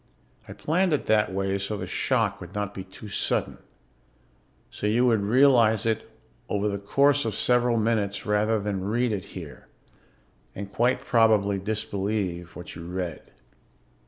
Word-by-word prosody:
I - - -8
planned 175 +2 +1
it 150 - 0
that 105 -2 +2
way 95 +1 -1
so 100 +2 -3
the - - -4
shock - - 0
would - - -10
not 105 -1 -2
be 95 - -6
too 95 +3 -12
sudden, 100 - -2 1.1
so 105 - -3
you 120 +4 +3
would 115 -4 +3
realize 115 -1 +4
it 110 0 -1 0.4
over 105 0 0
the 100 -1 -2
course 140 +8 +3
of 110 -3 -2
several 120 0 +2
minutes 105 -2 0
rather 105 +1 +2
than 100 -2 -3
read 115 +3 0
it 95 -4 -4
here - - -10 0.9
and 100 0 -7
quite 125 +2 +2
probably 105 -4 +3
disbelieve 100 -4 -3
what 90 - -8
you 85 0 -8
read. 90 -2 -5
105 Hz, 155 wpm, -26 LUFS, 100-115 Hz, 1.1 s, realize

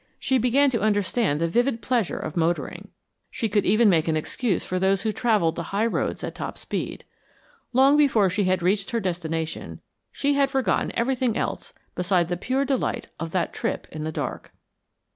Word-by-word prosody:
She 265 -1 +1
began 265 +4 +3
to 230 - 0
understand 205 -5 +1
the 165 - +1
vivid 240 +6 +1
pleasure 240 -7 0
of 155 - -5
motoring; 170 0 -1 0.4
she 225 - -2
could 205 -1 +1
even 215 +4 +5
make 165 -5 +3
an 160 -1 +1
excuse 190 +5 -1
for 185 - -2
those 190 +1 +2
who 220 - +1
travelled 210 -8 +2
the - - -3
high 205 +3 +1
roads 230 - -1
at - - -4
top - - -6
speed. - - -4 0.7
Long 270 +4 +5
before 250 -9 +4
she 185 +2 0
had 185 -1 +1
reached 195 +2 +1
her 235 - 0
destination 165 -4 -3 0.3
she 285 0 0
had 280 -1 +2
forgotten 265 -9 0
everything 245 -1 0
else - - -3 0.2
beside 180 -1 +1
the 175 - 0
pure 260 +8 0
delight 265 -2 -1
of 165 +1 -4
that 185 -3 0
trip - - -3
in 155 0 -5
the 160 - -3
dark. - - -5
205 Hz, 185 wpm, -24 LUFS, 175-245 Hz, 0.7 s, even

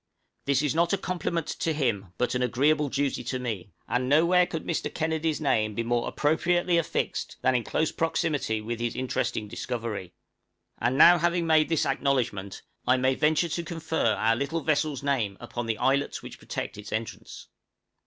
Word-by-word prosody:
This 140 0 +2
is 145 - +1
not 170 +3 +2
a - - +3
compliment 170 -3 -2
to 165 - -2
him, 105 - -1
but 125 - 0
an 125 - 0
agreeable 145 +5 +2
duty 140 -2 -1
to 130 +2 -2
me, 110 -7 -4 0.2
and 125 +1 0
nowhere 170 +5 +5
could 160 - -5
Mr. 165 - -2
Kennedy's 160 -1 -1
name 110 -8 +1
be 115 - -1
more 120 0 0
appropriately 170 +3 +2
affixed 165 - -2
than 130 - +4
in 125 -2 +1
close 160 +6 0
proximity 155 -9 -1
with 115 +2 -4
his 120 0 -2
interesting 125 -4 -2
discovery. 105 -5 -5 0.6
And 125 +2 +1
now 175 +4 +8
having 175 +1 +1
made 155 -1 +4
this 165 -2 +1
acknowledgment, 130 -8 -1 0.2
I 125 +1 +5
may 130 +1 +2
venture 155 +4 +2
to 170 +2 -2
confer 160 -9 0
our 115 +1 +2
little 140 +7 -2
vessel's 150 -3 0
name 120 -9 0
upon 120 0 -5
the 110 -1 -1
islets 140 +2 0
which - - -9
protect 100 - -5
its 105 - -9
entrance. 110 +1 -6
140 Hz, 175 wpm, -27 LUFS, 120-160 Hz, 0.6 s, now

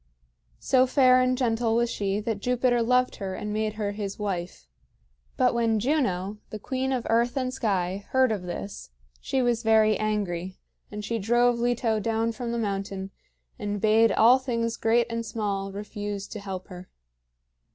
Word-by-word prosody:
So 260 0 +3
fair 255 -1 +5
and 255 0 +1
gentle 230 -2 +1
was 235 +1 +2
she 200 0 -1
that 220 -1 -2
Jupiter 245 +1 +1
loved 250 +2 +2
her 190 -1 -4
and 210 0 -4
made 215 0 -1
her 210 -2 -2
his 200 -1 -5
wife. 180 - -4 0.7
But - - +3
when 230 -2 +1
Juno, 210 - 0
the 215 - -6
queen 260 +4 -2
of 250 -3 -1
earth 235 +3 +1
and 255 -1 -1
sky, 195 -4 -1
heard 260 -2 +3
of 210 -4 -2
this, 180 +3 -7 0.3
she 260 - -1
was 240 -1 +1
very 220 -1 +4
angry; 190 -4 -2 0.3
and 210 0 -6
she 230 +1 -2
drove 240 +3 +2
Leto 235 -2 +1
down 225 +1 0
from 235 0 -5
the 235 - -2
mountain 195 -2 -3 0.5
and 205 -2 -3
bade 220 +2 +4
all 240 +6 +6
things 230 -3 -2
great 235 +1 +2
and 230 0 -3
small 205 -3 -3
refuse 205 0 -5
to 215 - -6
help 190 -2 -7
her. 180 0 -10
220 Hz, 170 wpm, -26 LUFS, 200-240 Hz, 0.7 s, all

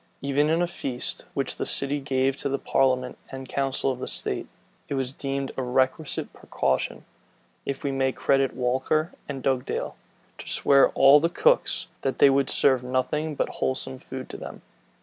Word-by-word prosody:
Even 140 +2 +1
in 165 +2 +2
a - - +3
feast 135 -7 -3
which - - -1
the - - -2
city 140 +1 +2
gave 135 -1 0
to 140 - -2
the 140 - 0
parliament 130 -2 0
and 135 0 -8
council 135 0 -1
of 130 -1 -5
state, - - -3 0.4
it 140 - -2
was 130 -1 -2
deemed 140 -1 -3
a - - -2
requisite 130 +4 -1
precaution, 65 -1 -2 0.6
if 140 -1 -3
we 140 - -1
may 135 -1 +1
credit 135 -1 +1
Walker 130 +6 0 0.2
and 135 -2 -5
Dugdale, 130 -2 -1 0.4
to - - -7
swear 140 -1 +5
all 140 +2 +7
the 165 +3 +1
cooks, - - +2 0.2
that 135 - -2
they 140 - +6
would 135 0 +2
serve 130 -3 +4
nothing 145 +5 -1
but - - 0
wholesome 130 0 -2
food 130 -1 -8
to - - -7
them. - - -9
135 Hz, 170 wpm, -25 LUFS, 130-140 Hz, 0.6 s, all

